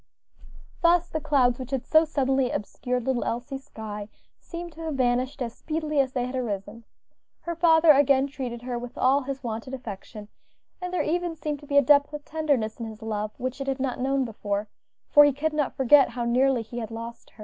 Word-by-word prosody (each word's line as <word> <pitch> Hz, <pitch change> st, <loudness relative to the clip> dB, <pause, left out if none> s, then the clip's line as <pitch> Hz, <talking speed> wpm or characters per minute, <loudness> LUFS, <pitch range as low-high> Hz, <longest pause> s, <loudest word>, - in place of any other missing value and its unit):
Thus 345 Hz, 0 st, +4 dB
the 315 Hz, -, -3 dB
clouds 255 Hz, -5 st, +2 dB
which 255 Hz, -1 st, -6 dB
had 265 Hz, -2 st, -2 dB
so 315 Hz, +1 st, +5 dB
suddenly 270 Hz, -4 st, +1 dB
obscured 250 Hz, +4 st, -3 dB
little 260 Hz, -2 st, 0 dB
Elsie's 260 Hz, +3 st, -4 dB
sky, 210 Hz, -1 st, -7 dB, 0.3 s
seemed 345 Hz, 0 st, -7 dB
to 325 Hz, -, -11 dB
have 320 Hz, -3 st, -3 dB
vanished 255 Hz, +1 st, 0 dB
as 230 Hz, -1 st, -5 dB
speedily 310 Hz, -2 st, -2 dB
as 265 Hz, -1 st, +1 dB
they 250 Hz, -2 st, 0 dB
had 250 Hz, +1 st, -5 dB
arisen. 220 Hz, -2 st, -4 dB, 0.6 s
Her 340 Hz, -, -3 dB
father 325 Hz, -1 st, +6 dB
again 275 Hz, -1 st, +4 dB
treated 255 Hz, -4 st, -6 dB
her 245 Hz, -1 st, -3 dB
with 245 Hz, 0 st, -9 dB
all 270 Hz, +2 st, +3 dB
his 275 Hz, 0 st, -5 dB
wonted 230 Hz, +3 st, -4 dB
affection, 210 Hz, -3 st, -9 dB, 0.5 s
and 360 Hz, 0 st, -4 dB
there 365 Hz, -, 0 dB
even 345 Hz, +1 st, -1 dB
seemed 300 Hz, -2 st, -4 dB
to 290 Hz, -, -14 dB
be 285 Hz, -, +1 dB
a 285 Hz, -, +7 dB
depth 285 Hz, +2 st, +4 dB
of 295 Hz, -1 st, -7 dB
tenderness 285 Hz, -9 st, -1 dB
in 230 Hz, -, -4 dB
his 220 Hz, 0 st, -10 dB
love 215 Hz, -1 st, -2 dB
which 255 Hz, +2 st, -4 dB
it 275 Hz, -, -4 dB
had 270 Hz, 0 st, -1 dB
not 260 Hz, -2 st, -2 dB
known 270 Hz, +1 st, +1 dB
before, 205 Hz, -2 st, -3 dB, 0.4 s
for 295 Hz, -, +8 dB
he 290 Hz, -, +5 dB
could 300 Hz, +3 st, -2 dB
not 295 Hz, -3 st, -1 dB
forget 270 Hz, +1 st, +6 dB
how 240 Hz, 0 st, -3 dB
nearly 250 Hz, 0 st, +2 dB
he 235 Hz, +2 st, -7 dB
had 225 Hz, -, -5 dB
lost 230 Hz, +1 st, -8 dB
her. -, -, -28 dB
265 Hz, 210 wpm, -26 LUFS, 235-295 Hz, 0.6 s, for